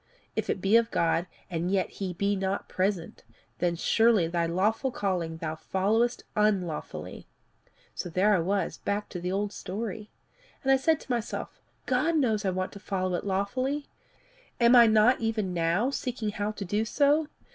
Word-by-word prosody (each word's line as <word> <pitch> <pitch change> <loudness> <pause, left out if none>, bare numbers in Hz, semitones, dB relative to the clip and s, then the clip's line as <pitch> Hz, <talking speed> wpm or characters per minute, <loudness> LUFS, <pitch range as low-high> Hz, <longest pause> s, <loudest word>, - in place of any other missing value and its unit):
If - - -2
it 190 - -1
be 200 +4 +5
of 230 0 +2
God, 170 -1 +1 0.2
and 175 -1 -2
yet 190 -1 +1
he 185 -2 -2
be 200 +3 0
not 190 +1 -2
present, 185 -3 -2 0.4
then 175 -1 +1
surely 225 +1 +3
thy 170 0 0
lawful 205 +10 +1
calling 180 -7 -2
thou 160 -1 -3
followest 215 +9 0
unlawfully." 195 -7 -1 0.7
"So - - -5
there 190 +5 +3
I 190 - +3
was 190 +1 -1
brought - - -38
back 205 +1 -1
to 180 - -5
the 180 +1 -3
old 205 +1 -1
story. 210 +2 -5 0.5
And 270 - +3
I - - +7
said 315 +3 +2
to - - -8
myself, 235 -2 -3 0.2
'God 300 +6 +1
knows 220 -8 +1
I - - +2
want 185 0 -2
to 200 - -10
follow 185 -2 -2
it 175 - -2
lawfully. 255 +9 -1 0.7
Am 235 +1 +6
I 235 -1 +9
not 220 +4 +5
even 215 -5 -1
now 175 +9 +1
seeking 245 -5 -3
how 205 0 -2
to 200 - -6
do 205 +4 0
so? 290 +6 +2
200 Hz, 180 wpm, -28 LUFS, 185-230 Hz, 0.7 s, I